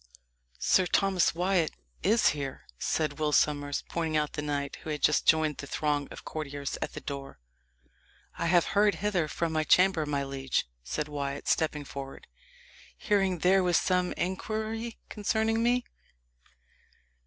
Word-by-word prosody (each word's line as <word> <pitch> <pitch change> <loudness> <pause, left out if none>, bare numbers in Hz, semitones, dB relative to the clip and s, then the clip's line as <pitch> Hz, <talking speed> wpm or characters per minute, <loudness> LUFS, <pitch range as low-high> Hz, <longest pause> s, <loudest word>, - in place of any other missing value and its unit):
"Sir 185 - +3
Thomas 190 -4 +2
Wyat 180 -2 +2 0.3
is 220 +2 +4
here," 140 -3 -4 0.2
said 155 -2 -1
Will 150 -1 +1
Sommers, 145 -1 +1
pointing 160 -2 -1
out 150 -1 -1
the - - -3
knight, 145 -1 -3
who - - -9
had 150 -1 -3
just 150 - +3
joined 155 -2 +4
the 140 - -7
throng 145 -1 -1
of - - -11
courtiers 145 -2 -4
at - - -3
the - - -7
door. 140 - -7 1.0
"I 170 - 0
have 175 0 +4
hurried 205 0 +4
hither 190 -6 0
from 165 +2 -2
my 155 0 +1
chamber, 180 -2 +4
my 140 -1 0
liege," 135 -1 -1 0.2
said 150 - -3
Wyat, 140 -2 -4
stepping 150 -2 +1
forward, 135 0 -8 0.7
"hearing 195 - +1
there 185 +3 +4
was 175 -2 +3
some 180 -1 +1
inquiry 220 +5 -3
concerning 220 +1 0
me." 245 +1 +2
160 Hz, 150 wpm, -29 LUFS, 145-190 Hz, 1.0 s, is